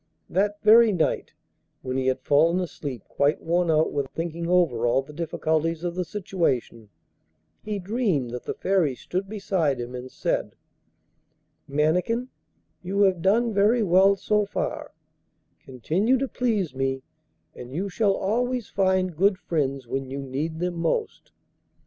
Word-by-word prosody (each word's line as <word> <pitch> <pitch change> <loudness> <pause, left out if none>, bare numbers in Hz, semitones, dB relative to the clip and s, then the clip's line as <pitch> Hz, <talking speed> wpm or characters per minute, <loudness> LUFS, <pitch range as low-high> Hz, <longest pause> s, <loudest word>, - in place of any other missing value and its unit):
That 205 +3 +1
very 225 +1 +7
night, 175 -5 -1 0.5
when 130 -1 -3
he 130 0 0
had 130 - 0
fallen 165 +5 +3
asleep 145 - -5
quite 145 +2 +1
worn 170 +1 0
out 155 0 +2
with 140 -2 -1
thinking 170 0 -4
over 155 -10 +2
all 130 +3 +2
the 150 +3 -13
difficulties 160 0 -1
of 175 -1 -2
the 180 +1 -2
situation, 160 - -2 0.7
he 210 -1 -4
dreamed 190 - -1
that 125 0 -6
the - - -3
Fairy 185 -8 +1
stood 185 +8 -4
beside 185 -10 0
him, 120 +1 -5
and 125 +1 -7
said: - - -2 1.1
'Mannikin, 180 - 0 0.5
you 190 +3 -1
have 190 -4 +3
done 225 +5 +2
very 215 +4 +3
well 190 +1 +5
so 210 +2 +1
far; 205 - -4 0.7
continue 175 - 0
to 270 +2 -1
please 215 - -1
me 135 0 -2 0.5
and 125 0 -10
you 180 +8 -2
shall 200 +1 +1
always 245 +4 -1
find 185 -2 +1
good 195 +3 +3
friends 140 -7 -2
when 135 +2 -4
you 135 - -5
need 145 +5 -3
them 175 +1 -2
most. 430 - -2
175 Hz, 150 wpm, -25 LUFS, 140-200 Hz, 1.1 s, very